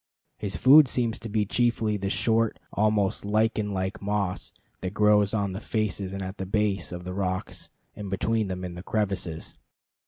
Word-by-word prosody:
His 100 -4 -2
food 140 - +7
seems 120 -3 0
to 115 - -7
be 105 0 +1
chiefly 115 -1 +1
the 95 -1 -2
short, 115 +2 +1 0.2
almost 105 -2 +1
lichen 110 0 +1
like 95 0 -3
moss 100 -2 -2 0.3
that 95 +2 -5
grows 105 -1 +4
on 100 -3 0
the 95 - -5
faces 105 -4 -2
and 95 0 -4
at 95 +2 -6
the 95 - -2
base 100 -3 0
of 90 0 -6
the 90 +1 -5
rocks 95 -1 -3 0.3
and 105 -2 -6
between 110 +3 0
them 90 -1 -4
in 90 - -6
the 90 - -7
crevices. 95 -6 -2
100 Hz, 180 wpm, -26 LUFS, 95-110 Hz, 0.3 s, food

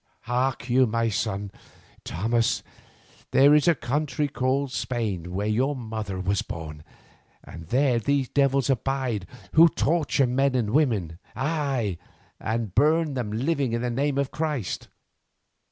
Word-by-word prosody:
Hark 125 +1 -1
you, 130 +1 +4
my 115 +1 0
son 100 -1 -2 0.5
Thomas, 115 +6 0 0.7
there 140 +2 +6
is 150 +2 +4
a 170 - +5
country 145 +3 -1
called 135 0 -1
Spain 105 -10 -3
where 100 +3 -2
your 125 +7 +1
mother 110 -6 -5
was 95 +2 0
born, 75 -2 -7 0.6
and 85 -1 -11
there 125 - +2
these 135 +3 0
devils 140 -2 +2
abide 130 -6 -1 0.3
who 165 +1 +8
torture 155 -4 +1
men 130 +2 +1
and 115 -4 0
women, 110 - +1 0.2
aye, 135 - -1 0.4
and 110 -3 -2
burn 155 +2 +3
them 125 -5 -3
living 135 +2 0
in 115 +1 -1
the 125 - -1
name 140 +3 0
of 140 -1 0
Christ. 150 - -3
125 Hz, 135 wpm, -25 LUFS, 110-140 Hz, 0.7 s, who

